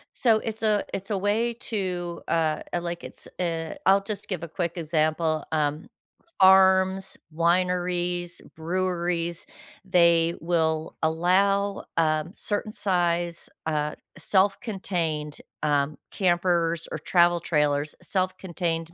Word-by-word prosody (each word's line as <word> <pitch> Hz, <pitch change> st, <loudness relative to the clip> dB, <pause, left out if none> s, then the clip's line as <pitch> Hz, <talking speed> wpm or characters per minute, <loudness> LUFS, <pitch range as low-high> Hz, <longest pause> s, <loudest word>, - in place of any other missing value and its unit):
So 225 Hz, -3 st, +4 dB
it's 220 Hz, 0 st, -5 dB
a 215 Hz, -2 st, +2 dB
it's 195 Hz, +2 st, -4 dB
a 205 Hz, -, 0 dB
way 215 Hz, +5 st, +1 dB
to, 185 Hz, -7 st, -3 dB
uh, 160 Hz, -2 st, +1 dB
uh, 175 Hz, -, -1 dB
like 170 Hz, 0 st, -5 dB
it's, -, -, -7 dB
uh, 165 Hz, -2 st, -2 dB
I'll 195 Hz, +1 st, +5 dB
just 200 Hz, 0 st, -5 dB
give 180 Hz, -4 st, -3 dB
a -, -, -4 dB
quick 170 Hz, +1 st, -3 dB
example, 155 Hz, 0 st, 0 dB
um, 150 Hz, +1 st, -1 dB, 0.5 s
farms, 190 Hz, 0 st, +5 dB, 0.2 s
wineries, 175 Hz, 0 st, 0 dB, 0.2 s
breweries, 175 Hz, 0 st, -2 dB, 0.4 s
they 170 Hz, -2 st, +4 dB
will 160 Hz, -1 st, 0 dB
allow, 195 Hz, +5 st, +2 dB
um, 155 Hz, 0 st, +1 dB
certain 210 Hz, +1 st, -2 dB
size, 175 Hz, -4 st, 0 dB, 0.2 s
uh, 150 Hz, -1 st, -1 dB, 0.2 s
self-contained, 180 Hz, -5 st, 0 dB, 0.3 s
um, 145 Hz, 0 st, +1 dB
campers 175 Hz, -2 st, +1 dB
or -, -, -3 dB
travel 175 Hz, -1 st, +3 dB
trailers. 150 Hz, -2 st, 0 dB
Self-contained 175 Hz, -3 st, -2 dB
175 Hz, 115 wpm, -26 LUFS, 165-190 Hz, 0.5 s, I'll